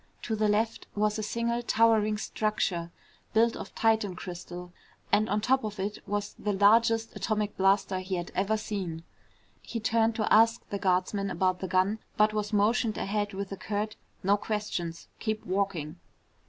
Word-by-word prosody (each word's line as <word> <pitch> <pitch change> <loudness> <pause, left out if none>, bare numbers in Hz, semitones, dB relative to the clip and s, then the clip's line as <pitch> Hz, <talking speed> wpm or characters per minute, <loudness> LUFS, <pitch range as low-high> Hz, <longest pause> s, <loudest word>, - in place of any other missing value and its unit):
To 220 - -1
the 215 0 +2
left 220 +2 0
was 210 +1 +1
a - - -1
single 235 +2 -1
towering 220 -2 +3
structure 200 -6 -1 0.4
built 230 +1 +4
of - - -8
Titan 220 -4 +2
crystal 180 0 -8 0.4
and 215 +1 +3
on 210 +1 +1
top 260 +3 +2
of 210 -2 -5
it 205 +2 -3
was 205 0 -2
the 210 - -1
largest 225 +3 +4
atomic 210 -2 -1
blaster 195 0 +2
he 185 0 -3
had 175 -1 -4
ever 200 +3 +1
seen. 190 -7 -4 0.6
He 230 - -5
turned 225 +1 +2
to 215 - +1
ask 225 +1 +4
the 200 - -3
guardsman 195 +1 +1
about 185 0 +1
the 190 - -3
gun 185 +4 +2 0.2
but 215 0 +4
was 210 -1 -2
motioned 215 +2 +2
ahead 205 0 -1
with 200 0 -4
a 195 - -4
curt, 215 +2 -3 0.3
"No 200 +2 +4
questions. 200 -6 -3
Keep 215 -1 -2
walking." 185 -5 -1
210 Hz, 165 wpm, -29 LUFS, 190-220 Hz, 0.6 s, built